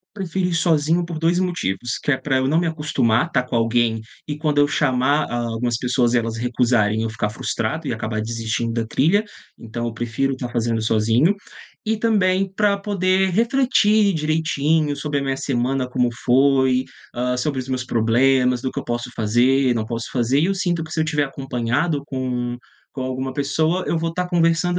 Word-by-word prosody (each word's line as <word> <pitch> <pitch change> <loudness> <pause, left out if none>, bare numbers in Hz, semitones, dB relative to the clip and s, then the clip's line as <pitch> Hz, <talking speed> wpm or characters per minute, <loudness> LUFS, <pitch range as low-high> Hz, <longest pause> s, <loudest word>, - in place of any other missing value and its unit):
Prefiro 190 -1 -2
ir 180 - -2
sozinho 165 0 +2
por 170 -2 -6
2 170 +2 +2
motivos, 120 - -2
que - - -4
é 145 - +4
pra 130 0 -1
eu 130 0 +1
não 155 - +2
me 175 - +2
acostumar 150 -5 +1
tá 130 -6 +1
com 125 - -11
alguém 115 -1 +2 0.3
e 150 -1 -4
quando 150 -2 0
eu 145 - +5
chamar, 145 +1 +1
hã, 120 -1 -2
algumas 120 +1 -1
pessoas 125 0 +1
elas 115 -1 -1
recusarem 115 -3 +1
eu 115 - -1
ficar 105 -1 -2
frustrado 115 +7 -3
e - - -2
acabar 110 -1 -3
desistindo 115 +1 -2
da 115 -1 -2
trilha, 175 - +2 0.3
então 115 +1 -5
eu 115 - -3
prefiro 120 +4 -1
tá 125 - -4
fazendo 115 -1 -1
sozinho. 115 - +2 0.5
E 220 0 0
também 195 -4 +2
para 200 0 +2
poder 190 -1 +1
refletir 220 -2 +3
direitinho 155 -1 0
sobre 145 -1 -2
a 140 - -3
minha 135 -1 -1
semana, 130 0 -1
como 125 -1 +1
foi, 130 0 +3 0.3
hã, 125 +1 -1
sobre 135 +1 -1
os 130 - -6
meus 130 -2 -2
problemas, 125 +2 +2
do 130 - -2
que - - -4
eu - - -7
posso 120 +1 -3
fazer, 125 +4 +2
não 110 -1 -1
posso 115 +1 -5
fazer 125 +2 +2
e 155 - +3
eu 195 +2 0
sinto 175 -3 -1
que 160 0 -8
se 160 - -2
eu - - +2
estiver 150 -2 0
acompanhado 135 +3 -1
com 125 -3 -3 0.4
com 130 - -5
alguma 130 0 -3
pessoa 160 +6 0
eu 170 - 0
vou 165 0 -2
tá 180 +1 -1
conversando 175 0 +2
135 Hz, 195 wpm, -21 LUFS, 120-165 Hz, 0.5 s, eu